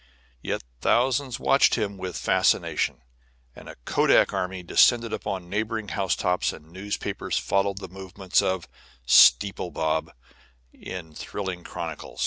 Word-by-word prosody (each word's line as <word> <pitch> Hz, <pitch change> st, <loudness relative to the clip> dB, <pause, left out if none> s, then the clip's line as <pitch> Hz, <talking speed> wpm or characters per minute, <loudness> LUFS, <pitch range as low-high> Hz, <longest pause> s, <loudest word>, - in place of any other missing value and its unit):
Yet -, -, -3 dB, 0.2 s
thousands 125 Hz, -, +1 dB
watched 135 Hz, -, +4 dB
him 105 Hz, -4 st, -2 dB
with 95 Hz, -2 st, -5 dB
fascination, -, -, +1 dB, 0.5 s
and -, -, -12 dB
a -, -, -10 dB
kodak -, -, +3 dB
army 90 Hz, 0 st, -3 dB
descended 115 Hz, +6 st, +3 dB
upon 95 Hz, -3 st, -4 dB
neighboring 110 Hz, +2 st, -3 dB
housetops, 90 Hz, 0 st, 0 dB
and 80 Hz, +2 st, -14 dB
newspapers 100 Hz, +3 st, -4 dB
followed 100 Hz, 0 st, 0 dB
the 95 Hz, -1 st, -6 dB
movements 95 Hz, 0 st, -1 dB
of 95 Hz, -2 st, -2 dB, 0.4 s
"Steeple 100 Hz, +7 st, +5 dB
Bob" 80 Hz, 0 st, -1 dB, 0.6 s
in 85 Hz, -4 st, -8 dB
thrilling 95 Hz, +2 st, -5 dB
chronicle. -, -, -7 dB
95 Hz, 120 wpm, -25 LUFS, 90-105 Hz, 0.6 s, Steeple